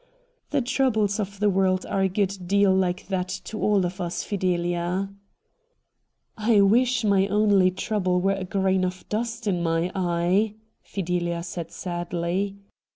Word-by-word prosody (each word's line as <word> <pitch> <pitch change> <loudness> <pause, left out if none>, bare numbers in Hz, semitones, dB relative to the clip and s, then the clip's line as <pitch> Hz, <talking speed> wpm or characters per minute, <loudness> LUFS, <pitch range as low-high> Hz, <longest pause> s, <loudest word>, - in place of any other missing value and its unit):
The 285 - +1
troubles 230 -5 +1
of 200 -1 -4
the 210 0 +3
world 185 -1 +1
are 195 - -1
a 190 - +2
good 195 +1 0
deal 200 0 +4
like 180 -1 0
that 185 -2 -1 0.2
to 215 - -6
all 205 -3 +3
of 180 +2 -4
us, 175 -1 -3
Fideha.' 175 0 -1 0.7
' - - -51 0.5
I 215 -1 +4
wish 240 +4 +3
my 200 -2 +3
only 205 -3 +4
trouble 185 -1 0
were 195 +2 +2
a 195 -1 -4
grain 190 0 +1
of 185 0 -4
dust 230 +1 -3
in 185 -4 0
my 165 +1 0
eye,' 185 +3 +1 0.3
Fidelia 175 -2 -2
said 170 -1 -6
sadly. 175 +2 -3
190 Hz, 155 wpm, -25 LUFS, 180-205 Hz, 0.7 s, deal